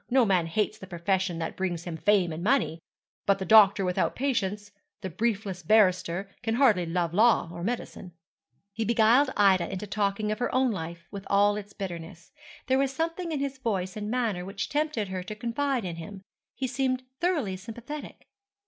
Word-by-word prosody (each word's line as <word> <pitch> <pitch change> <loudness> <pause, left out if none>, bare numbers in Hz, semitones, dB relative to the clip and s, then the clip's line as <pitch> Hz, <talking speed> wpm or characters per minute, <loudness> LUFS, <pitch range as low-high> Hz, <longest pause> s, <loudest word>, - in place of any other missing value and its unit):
No 255 -1 +4
man 185 -5 +2
hates 210 +5 -1
the 190 - -10
profession 185 0 -1
that 165 -1 -4
brings 175 -3 -2
him 175 -2 -5
fame 185 -1 +2
and 165 +2 -6
money; 225 -8 +1 0.5
but 200 - +4
the 190 - -4
doctor 200 -1 +6
without 180 0 0
patients, 210 -6 -1 0.3
the 190 -2 -5
briefless 195 -1 -2
barrister, 185 -1 +3
can 225 -1 -1
hardly 220 -10 +3
love 170 -1 -1
law 215 -4 +4
or 170 0 -6
medicine.' 215 -4 -4 0.6
He 225 +2 -2
beguiled 235 +5 +4
Ida 195 -4 +4
into 190 +2 -4
talking 205 +1 -1
of 215 - -3
her 245 - -1
own 255 -1 +3
life, 170 -3 -6
with 200 -1 -8
all 205 +1 +3
its 205 -1 -7
bitterness. 170 -2 -7 0.3
There 260 0 +2
was 275 -1 +1
something 330 +4 -3
in 295 -3 -2
his 275 -1 -3
voice 195 -7 -2
and 210 0 -4
manner 225 -7 -1
which 195 -1 -5
tempted 290 -9 -1
her 185 -1 -3
to 185 +4 -7
confide 240 +2 -1
in 170 -2 -5
him. 190 +4 -8 0.3
He 265 - -2
seemed 255 0 -1 0.2
thoroughly 305 - 0
sympathetic. 240 +9 -8
205 Hz, 185 wpm, -27 LUFS, 185-240 Hz, 0.6 s, doctor